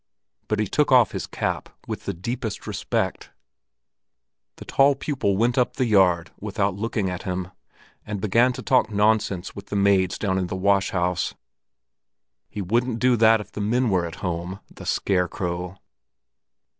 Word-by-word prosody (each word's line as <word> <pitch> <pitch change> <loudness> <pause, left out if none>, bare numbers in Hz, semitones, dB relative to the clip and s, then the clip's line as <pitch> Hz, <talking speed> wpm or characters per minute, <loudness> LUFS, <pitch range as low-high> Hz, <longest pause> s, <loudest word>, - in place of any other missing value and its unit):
But 110 - 0
he 110 - +2
took 145 +9 +1
off 125 -5 +6
his - - -4
cap - - -3 0.2
with - - -6
the - - -1
deepest 115 +4 -4
respect. - - -2 1.3
The - - -11
tall 140 +1 +4
pupil 130 -9 -1
went 120 +4 +2
up 125 - +1
the 130 - +1
yard 95 -6 +3
without 100 -1 -1
looking 105 0 -2
at 90 -1 -4
him, 90 -1 -3 0.5
and 105 -1 -5
began 115 +5 +3
to 130 0 -7
talk 130 -4 +3
nonsense 105 -3 +1
with 100 0 -9
the - - -4
maids 100 -2 +3
down 95 -2 0
in 90 - -1
the 95 - -4
wash 100 0 +2
house. 90 -1 -1 1.1
He 105 - -5
wouldn't 120 +5 0
do 125 +1 +3
that 110 0 +5
if 105 - -12
the 105 - -5
men 120 +3 +1
were 90 -3 +1
at 80 - -8
home, 90 +2 -3
the - - -10
scarecrow! 90 -1 -1
100 Hz, 165 wpm, -24 LUFS, 95-115 Hz, 1.3 s, off